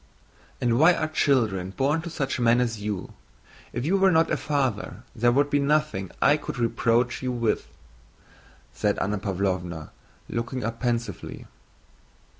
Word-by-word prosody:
"And 120 -1 +2
why 170 +3 +6
are 155 - -1
children 110 - +1
born 145 +4 +2
to 170 - -6
such 140 -6 -2
men 120 0 +4
as 115 -4 -1
you? 105 -3 -4 0.6
If 120 +2 -3
you 190 +5 +3
were 195 0 +5
not 165 -2 +3
a - - +3
father 130 -6 -2
there 120 +1 +3
would 145 +3 +2
be 145 - +3
nothing 140 - +1
I 145 - +5
could 150 - -6
reproach 120 +1 +1
you 130 -1 -1
with," 115 -3 0 1.1
said 105 -1 0
Anna 105 +1 -1
Pávlovna, 90 -4 -2 0.4
looking 125 +2 -3
up 115 +1 -3
pensively. 115 -6 -3
120 Hz, 150 wpm, -26 LUFS, 105-145 Hz, 1.1 s, why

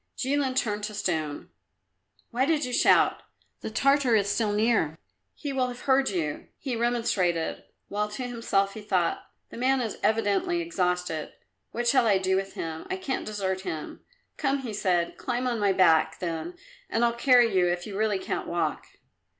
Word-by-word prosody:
Jilin 270 -1 0
turned 210 -5 0
to 210 -1 -6
stone. 160 -7 -2 0.8
"Why 250 +2 +1
did 305 -1 +1
you 250 - -5
shout? - - +4 0.4
The - - -5
Tartar 275 +1 +3
is 200 -2 +2
still 210 +1 +1
near; 210 -7 +1 0.4
he 285 -3 -5
will 260 -1 +1
have 245 0 -7
heard 270 0 +3
you," 160 -6 -3
he 260 -4 -3
remonstrated, 225 -8 0 0.2
while 210 +1 -2
to 215 +5 -5
himself 200 -5 0
he 220 - -8
thought, 185 -5 0 0.2
"The - - -9
man 260 +2 +2
is 225 -4 -3
evidently 225 - +1
exhausted; 180 - -2 0.4
what 240 +1 -3
shall 250 -1 +4
I 200 -3 +4
do 190 0 +1
with 195 0 -2
him? 160 -1 -5
I 380 - -2
can't 285 -8 -3
desert 190 -3 -2
him." 165 -5 -5 0.4
"Come," 275 -2 0
he 230 -4 -5
said, 180 -4 0
"climb 250 0 -2
on 250 - +1
to - - -4
my 200 -1 +3
back, 160 -4 +4
then, 170 - -4 0.3
and 230 +1 +2
I'll 235 - +2
carry 240 -3 +4
you 180 -1 +4
if 175 0 -1
you 205 - -7
really 210 -1 +1
can't 190 - -4
walk." 170 0 -2
215 Hz, 180 wpm, -27 LUFS, 185-250 Hz, 0.8 s, shout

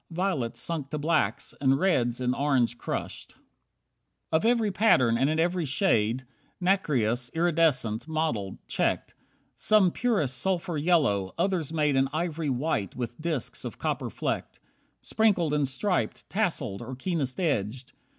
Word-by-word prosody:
Violets 165 -9 -1
sunk 155 -5 -3
to 150 - -3
blacks, 155 +2 0
and 135 -1 +4
reds 125 -9 +1
in 125 0 +1
orange 130 -4 +1
crushed. - - -5
32 - - -31 0.9
Of 160 +6 +2
every 230 -3 +3
pattern 130 - +4
and 135 +4 +2
in 155 +1 0
every 175 +1 +1
shade. 130 - +1 0.3
Nacreous, 130 - +1
iridescent, 155 -9 +1
mottled, 155 -12 -2
checked. - - -1 0.4
Some 210 -4 +3
purest 195 - 0
sulphur 180 +1 -1
yellow, 140 - +2
others 180 -6 0
made 150 -3 +1
An 135 0 +2
ivory 160 -1 -2
white 125 - -1
with 120 +2 -5
disks 155 -6 -2
of - - -6
copper - - -2
flecked. - - -3 0.4
Sprinkled 195 -9 +2
and 145 -2 +2
striped, 180 +9 -1
tasselled, 160 - -1
or 130 - -6
keenest 135 -3 -2
edged. 125 - -1
150 Hz, 140 wpm, -27 LUFS, 125-175 Hz, 0.9 s, and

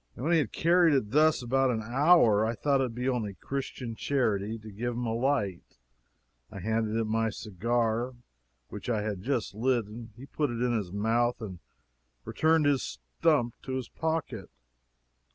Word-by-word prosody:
When 145 +7 -2
he 170 - +5
had 135 -8 -1
carried 170 -2 +4
it 105 -6 0
thus 155 -2 +4
about 135 +2 +2
an 110 -3 -1
hour, 120 -3 +4
I 115 +1 0
thought 140 +2 +1
it - - +2
would 115 -3 -6
be 125 +1 -2
only 115 -6 -1
Christian 130 +1 -5
charity 110 -5 0
to 110 -1 -11
give 120 +4 -3
him 120 +1 -3
a 115 - -1
light. 115 - -1 0.7
I 105 - -10
handed 110 +2 -1
him 110 - -1
my 115 +1 +1
cigar, 115 +4 -1 0.5
which 105 +4 -7
I 110 -3 0
had 105 -3 -3
just 120 -1 -2
lit, 120 +1 +1
and 110 +2 -9
he 130 - -10
put 145 0 -1
it 120 -1 -4
in 120 -1 +1
his 100 -6 -2
mouth 115 +4 +1
and 95 -6 -7 0.7
returned 160 -1 +2
his 145 -2 +3
stump 145 -8 0
to 130 - -6
his 130 -3 -4
pocket! 160 -10 -3
120 Hz, 180 wpm, -29 LUFS, 110-135 Hz, 0.7 s, he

